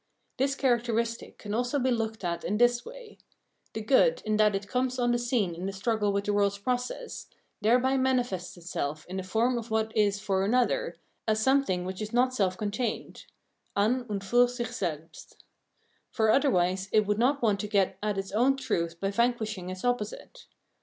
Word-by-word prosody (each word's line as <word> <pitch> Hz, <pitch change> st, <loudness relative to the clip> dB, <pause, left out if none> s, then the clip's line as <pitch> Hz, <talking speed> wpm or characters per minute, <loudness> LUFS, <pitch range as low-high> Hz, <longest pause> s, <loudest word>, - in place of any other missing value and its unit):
This 270 Hz, +1 st, +1 dB
characteristic 235 Hz, -3 st, 0 dB
can 205 Hz, -1 st, -6 dB
also 245 Hz, +5 st, 0 dB
be 260 Hz, -1 st, +1 dB
looked 220 Hz, -2 st, -2 dB
at 170 Hz, -1 st, -2 dB
in 205 Hz, +4 st, -1 dB
this 240 Hz, +1 st, +3 dB
way: -, -, -12 dB, 0.5 s
the 220 Hz, -, -4 dB
good, 485 Hz, -, +3 dB
in 215 Hz, 0 st, +1 dB
that 210 Hz, -1 st, +4 dB
it 195 Hz, +1 st, -4 dB
comes 255 Hz, +2 st, -1 dB
on 240 Hz, -1 st, +2 dB
the 240 Hz, -, +1 dB
scene 235 Hz, -7 st, 0 dB
in 175 Hz, +3 st, -5 dB
the -, -, -2 dB
struggle 210 Hz, +1 st, 0 dB
with 200 Hz, 0 st, 0 dB
the 205 Hz, -, 0 dB
world's 200 Hz, -1 st, +2 dB
process, 250 Hz, -, -3 dB, 0.3 s
thereby 250 Hz, +5 st, +3 dB
manifests 245 Hz, -10 st, 0 dB
itself 155 Hz, -3 st, -4 dB
in 185 Hz, +2 st, -5 dB
the -, -, -1 dB
form 230 Hz, +6 st, +1 dB
of 230 Hz, 0 st, -9 dB
what 220 Hz, 0 st, -1 dB
is 205 Hz, -2 st, +2 dB
for 195 Hz, -2 st, 0 dB
another, 255 Hz, -, +1 dB, 0.3 s
as 215 Hz, 0 st, +2 dB
something 240 Hz, -7 st, +2 dB
which 185 Hz, +2 st, -5 dB
is 215 Hz, +1 st, -5 dB
not 250 Hz, +1 st, +3 dB
self 190 Hz, -6 st, 0 dB
contained 215 Hz, +3 st, -3 dB, 0.5 s
{an 245 Hz, +5 st, +1 dB
und 200 Hz, -2 st, -3 dB
fur 245 Hz, +5 st, +4 dB
sich 240 Hz, -2 st, -4 dB
selbst), 165 Hz, -7 st, -6 dB, 0.7 s
for 220 Hz, -1 st, +2 dB
otherwise 190 Hz, -8 st, +2 dB
it 215 Hz, -1 st, +4 dB
would 210 Hz, +1 st, 0 dB
not 270 Hz, +3 st, +2 dB
want 210 Hz, -3 st, +2 dB
to 210 Hz, -, -3 dB
get 195 Hz, -2 st, +1 dB
at 210 Hz, -1 st, -1 dB
its 195 Hz, 0 st, -4 dB
own 255 Hz, +6 st, +3 dB
truth 170 Hz, -9 st, -2 dB
by 195 Hz, +1 st, -1 dB
vanquishing 220 Hz, -4 st, -1 dB
its 185 Hz, +4 st, -6 dB
opposite. 245 Hz, -, -3 dB
220 Hz, 185 wpm, -28 LUFS, 195-245 Hz, 0.7 s, that